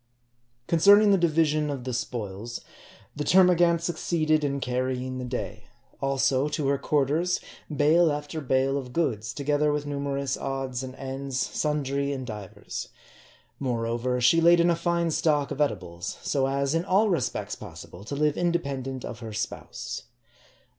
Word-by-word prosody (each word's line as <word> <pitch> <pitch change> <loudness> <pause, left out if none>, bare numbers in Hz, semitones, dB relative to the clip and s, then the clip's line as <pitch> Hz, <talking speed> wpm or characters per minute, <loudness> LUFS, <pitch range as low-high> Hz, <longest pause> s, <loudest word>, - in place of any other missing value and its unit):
Concerning 200 +5 +6
the - - +6
division 155 -2 +2
of 135 -3 -4
the 130 0 -4
spoils, 115 -1 -4 0.5
the 150 - -2
termagant 175 -1 +5
suc 170 -2 -2
ceeded 155 -3 +1
in 140 -1 0
carrying 130 0 -2
the - - -4
day; 110 -4 -5 0.4
also, 135 0 +1
to 150 -2 -1
her 140 -1 +1
quarters, 155 +5 +1 0.3
bale 155 +2 +4
after 150 +2 -4
bale 135 +1 +1
of 125 -2 -9
goods, 115 -9 -1
together 145 +2 +1
with 145 0 -1
numerous 140 -1 -2
odds 135 -2 -3
and 130 -1 -7
ends, 135 0 -4
sundry 140 -2 -1
and 130 -2 -5
divers. 105 -2 -7 0.7
Moreover, 120 -1 -1
she 165 +7 +5
laid 170 +1 +6
in 170 +1 +4
a - - +2
fine 170 0 0
stock 150 -3 +1
of 145 - -2
edibles, 90 -11 -2
so 135 -2 +1
as, 140 +1 0
in 165 +1 +1
all 195 +4 +3
respects 165 - -1
possible, 90 - -10
to 140 - -4
live 150 0 +2
independent 140 -7 -2
of 115 - -7
her 110 -2 -7
spouse. 125 +4 -5
140 Hz, 155 wpm, -26 LUFS, 125-155 Hz, 0.7 s, Concerning